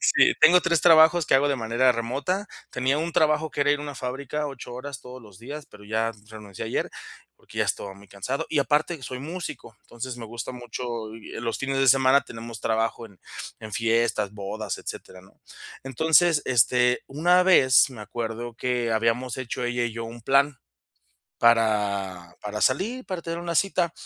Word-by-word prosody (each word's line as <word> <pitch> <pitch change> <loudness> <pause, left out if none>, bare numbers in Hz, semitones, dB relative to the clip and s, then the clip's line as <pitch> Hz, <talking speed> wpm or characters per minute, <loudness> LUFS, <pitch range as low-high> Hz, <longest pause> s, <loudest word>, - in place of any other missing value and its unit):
Sí, - - +4
tengo 175 +3 +7
tres 170 -1 +1
trabajos 160 0 +6
que - - +2
hago 140 +2 +4
de 140 - 0
manera 120 +2 +2
remota, 140 - -2 0.2
tenía 130 +3 0
un 165 +1 -3
trabajo, 155 0 +2
que - - -4
era 145 0 +3
ir 145 - -1
a - - -7
una 145 -1 -6
fábrica 140 +4 -4
8 125 -2 -9
horas 135 0 -7
todos 125 0 -11
los 105 -3 -15
días, 140 +5 -8
pero 105 - -16
ya 110 +2 -1 0.2
renuncié 105 -4 -8
ayer, - - -2 0.5
porque - - -11
ya - - +3
estaba 100 - -3
muy 100 +1 -16
cansado 100 +9 -4
y 155 - 0
aparte 150 +4 +1
que 135 - -17
soy 125 +1 -6
músico. 145 - -7
Entonces 120 +1 -7
me 115 -2 -8
gusta 115 +2 -6
mucho, 120 0 -7 0.3
eh, 115 0 -9 0.2
fines 135 0 -2
de 135 -1 +3
semana 135 +1 +5
tenemos 115 -1 -9
trabajo 115 +1 -1
en 100 -4 -20 0.4
en 110 -1 -9
fiestas, 115 -2 +1
bodas, 105 +1 -5
etcétera, 95 - -8
¿no? 95 - -23 0.4
Entonces, 160 +4 +3
este, 125 0 +3
una 175 +6 +3
vez 135 -9 +6
me 120 - -10
acuerdo 115 +2 -5
que 125 -1 -1
habíamos 115 +2 0
hecho 125 -1 -4
ella 120 0 -1
y 120 - -3
yo 115 0 -5
un 115 +1 -9
plan 140 +2 +2 0.8
para 100 -6 +1
para 105 0 -5
salir, 225 - 0
para 185 -3 -4
tener 165 0 -4
una 170 -1 -4
cita. 180 -4 +1
125 Hz, 185 wpm, -25 LUFS, 115-145 Hz, 0.8 s, tengo